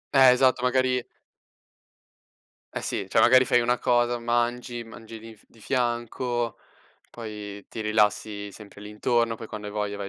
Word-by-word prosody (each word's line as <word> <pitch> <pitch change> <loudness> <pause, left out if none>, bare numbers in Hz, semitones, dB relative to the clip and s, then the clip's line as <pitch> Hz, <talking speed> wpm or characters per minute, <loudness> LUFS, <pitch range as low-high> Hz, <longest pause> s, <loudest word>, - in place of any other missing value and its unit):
Eh 130 -2 +8
esatto, 130 0 +3
magari 125 0 +1 1.7
eh - - -2
sì, - - -3
cioè - - +3
magari 130 +1 +6
fai 120 0 +3
una 120 +1 +1
cosa, 120 0 +2
mangi 120 0 -1
mangi 115 0 -11
di 115 0 -12
f 105 - -25
di 115 - -22
fianco, 120 -1 -1 0.5
poi 105 -3 -8
ti 115 - -8
rilassi 105 -1 0
sempre 100 0 -13
lì 105 - -9
intorno, 115 +2 0
poi 115 - -8
quando 105 -1 -7
hai - - -8
voglia 105 -1 -2
vai 100 -1 -5
115 Hz, 160 wpm, -26 LUFS, 105-120 Hz, 1.7 s, Eh